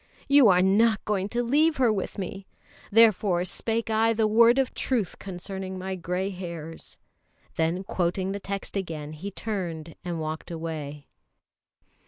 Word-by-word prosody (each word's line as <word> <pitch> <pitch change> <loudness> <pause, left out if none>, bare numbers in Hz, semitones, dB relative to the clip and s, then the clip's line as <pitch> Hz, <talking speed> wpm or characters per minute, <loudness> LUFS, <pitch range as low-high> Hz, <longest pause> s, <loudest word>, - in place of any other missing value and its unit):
You 280 -4 +7
are 180 -2 +5
not 215 +3 +3
going 200 -2 -1
to 240 +3 -1
leave 305 +6 +3
her 245 -4 +3
with 195 +1 -4
me! 195 0 -6 0.4
Therefore 200 -5 +4
spake 225 +4 -2
I 225 +1 +3
the 220 0 +1
word 230 +3 +5
of 270 -2 +1
truth 230 -9 -1
concerning 190 0 -6
my 190 +1 -4
grey 180 +2 -2
hairs." 170 -3 -7 0.6
Then 165 +3 0
quoting 185 +1 -1
the 200 - -3
text 195 0 -5
again, 160 -6 -4
he 175 +6 -6
turned 175 -6 -4
and 175 -2 -3
walked 155 +2 -5
away. 155 -4 -5
190 Hz, 150 wpm, -26 LUFS, 175-220 Hz, 0.6 s, You